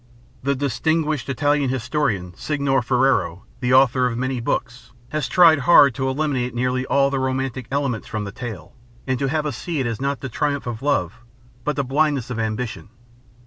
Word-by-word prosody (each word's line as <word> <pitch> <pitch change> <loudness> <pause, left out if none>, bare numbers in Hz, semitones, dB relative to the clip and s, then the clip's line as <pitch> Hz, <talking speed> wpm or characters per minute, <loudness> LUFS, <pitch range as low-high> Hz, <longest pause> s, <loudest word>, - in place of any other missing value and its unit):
The 140 +2 0
distinguished 150 +2 -1
Italian 145 0 +1
historian, 120 - -1
Signor 140 -1 0
Ferrero, 125 -7 +1
the 125 -1 -1
author 130 -1 +4
of 115 -2 -3
many 130 0 -1
books, 120 0 -3 0.2
has 155 -4 -2
tried 165 +2 +6
hard 140 -1 +6
to 130 +1 -1
eliminate 130 -3 -1
nearly 125 +1 -1
all 140 0 +3
the 135 - 0
romantic 130 -2 -2
elements 135 -5 -2
from 110 -2 -3
the 100 - -6
tale, 110 -6 -8 0.3
and 130 -2 -1
to 135 - 0
have 155 +2 -1
us 145 -5 -2
see 170 -4 -3
in 130 - 0
it 115 -1 -3
not 140 -2 -1
the 135 - -4
triumph 140 +3 -2
of 120 -2 -5
love, 115 - 0 0.4
but 150 +4 -1
the 140 - 0
blindness 140 -1 0
of 115 - -3
ambition. 110 0 -3
130 Hz, 185 wpm, -22 LUFS, 120-140 Hz, 0.4 s, tried